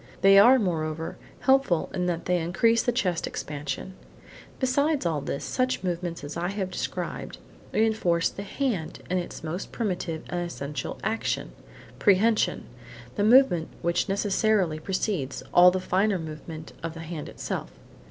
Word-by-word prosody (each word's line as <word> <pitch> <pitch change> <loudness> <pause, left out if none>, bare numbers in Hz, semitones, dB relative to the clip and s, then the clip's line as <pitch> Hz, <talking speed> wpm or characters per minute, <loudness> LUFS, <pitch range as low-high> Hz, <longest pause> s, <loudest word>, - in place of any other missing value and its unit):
They 195 0 +8
are, 245 +6 +8
moreover, 160 -6 -2 0.2
helpful 265 -10 +3
in 180 -1 -1
that 170 -1 -2
they 180 0 +2
increase 225 +8 +2
the 245 - +1
chest 185 -8 0
expansion. 145 +4 -5 0.7
Besides 280 - +1
all 160 -4 0
this, 140 0 -4
such 255 -5 0
movements 175 -3 -3
as 145 +1 -6
I 170 +1 -1
have 190 -1 -3
described, - - -4 0.3
reinforce 215 -7 +2
the - - -8
hand 200 - -3
in 185 - +2
its 175 - -7
most 165 +4 -4
primitive 180 -7 -3
and 175 - -2
essential 150 -6 -4
action, 225 +1 -1 0.5
prehension; 215 +2 +3 0.5
–the 205 - -1
movement 215 -9 +5 0.2
which 170 +2 +1
necessarily 200 -4 +1
precedes 185 -5 -2
all 180 +1 +9
the 185 +1 -1
finer 190 +2 +1
move 155 -2 -8
ments 160 -1 -8
of 165 0 -5
the 165 - -7
hand 165 -2 -6
itself. - - -4
180 Hz, 150 wpm, -26 LUFS, 165-215 Hz, 0.7 s, all